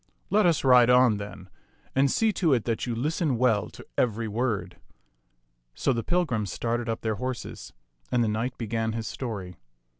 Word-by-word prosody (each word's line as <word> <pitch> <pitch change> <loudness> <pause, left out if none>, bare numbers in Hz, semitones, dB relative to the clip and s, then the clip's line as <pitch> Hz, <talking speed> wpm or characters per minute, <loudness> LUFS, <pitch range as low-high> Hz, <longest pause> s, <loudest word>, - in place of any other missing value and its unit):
Let 210 -2 +4
us 165 -4 +2
ride 125 -2 +6
on, 125 -3 +5
then; 100 -2 -8 0.5
and 135 +1 +3
see 220 +6 +2
to 165 -9 +3
it 115 - -1
that 115 +1 -1
you 120 - -2
listen 150 +2 0
well 115 -4 +2
to - - -13
every 115 -1 0
word." 110 0 -2 1.0
So 135 - +1
the 115 -1 -2
pilgrims 115 - 0
started 120 0 -2
up 115 - -2
their 110 -2 -1
horses, 125 +1 -5 0.4
and 120 -1 +3
the - - +1
knight 115 +4 -2
began 115 -1 -2
his 115 -1 -4
story. 100 - -5
120 Hz, 175 wpm, -27 LUFS, 110-130 Hz, 1.0 s, ride